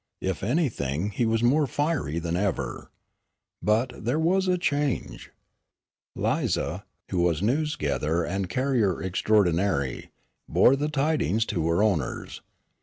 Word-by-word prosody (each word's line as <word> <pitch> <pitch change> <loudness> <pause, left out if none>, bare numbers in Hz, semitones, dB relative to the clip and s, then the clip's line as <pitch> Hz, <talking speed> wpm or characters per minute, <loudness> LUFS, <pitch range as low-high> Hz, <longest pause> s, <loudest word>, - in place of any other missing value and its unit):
If 95 -1 -2
anything 105 - -1
he 115 +3 0
was 115 +1 +1
more 140 +5 +3
fiery 145 - -1
than 85 0 -2
ever. 95 0 -2 0.7
But, 110 +4 +1
there 120 +7 0
was 185 +4 +2
a 180 0 +2
change. 145 -5 -2 0.9
Lize, - - 0 0.5
who 90 - 0
was 85 0 +1
news 150 +7 +1
gatherer 75 +3 -1
and 95 +1 -3
carrier 120 -5 +1
extraordinary, 95 - +1 0.4
bore 130 - +5
the 145 +2 -1
tidings 145 -6 +1
to 85 -4 0
her 85 +5 +2
owners. 95 -11 -1
105 Hz, 125 wpm, -26 LUFS, 85-145 Hz, 0.9 s, bore